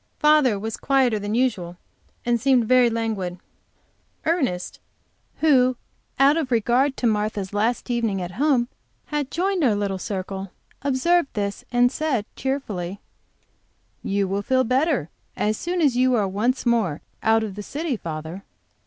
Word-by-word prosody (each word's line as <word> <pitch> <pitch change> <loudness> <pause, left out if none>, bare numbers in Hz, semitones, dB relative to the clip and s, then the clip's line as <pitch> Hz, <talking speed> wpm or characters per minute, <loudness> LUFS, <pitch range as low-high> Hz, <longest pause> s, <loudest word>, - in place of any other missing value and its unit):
Father 300 -7 +4
was 220 +2 -4
quieter 260 -5 +2
than 205 +2 -3
usual, 195 -9 0 0.5
and 240 -1 +1
seemed 255 -2 +4
very 250 +1 +5
languid. 220 -6 -2 0.9
Ernest 265 - -1 0.6
who, 255 -5 +4 0.4
out 280 +3 +5
of 310 -5 -1
regard 245 +4 +2
to - - -2
Martha's 210 -3 0
last 220 +4 0
evening 225 -5 0
at 175 -1 -4
home, 255 +2 +2 0.4
had 295 -3 -2
joined 370 +1 0
our 230 -6 +3
little 200 -2 -2
circle, 195 0 -4 0.3
observed 285 +4 +2
this, 200 -1 -3
and 245 0 +4
said, 275 -8 -1
cheerfully: 205 -9 -3 1.0
"You 200 0 0
will 195 +2 -1
feel 260 +5 +2
better 255 - +1 0.3
as 215 +1 +1
soon 350 +8 -2
as 280 -6 +3
you 255 0 +3
are 210 -4 +1
once 225 +8 0
more 220 -11 +1 0.2
out 220 0 +3
of 210 -3 -4
the 210 - -6
city, 295 +6 -3
father." 165 0 -6
235 Hz, 145 wpm, -23 LUFS, 200-270 Hz, 1.0 s, very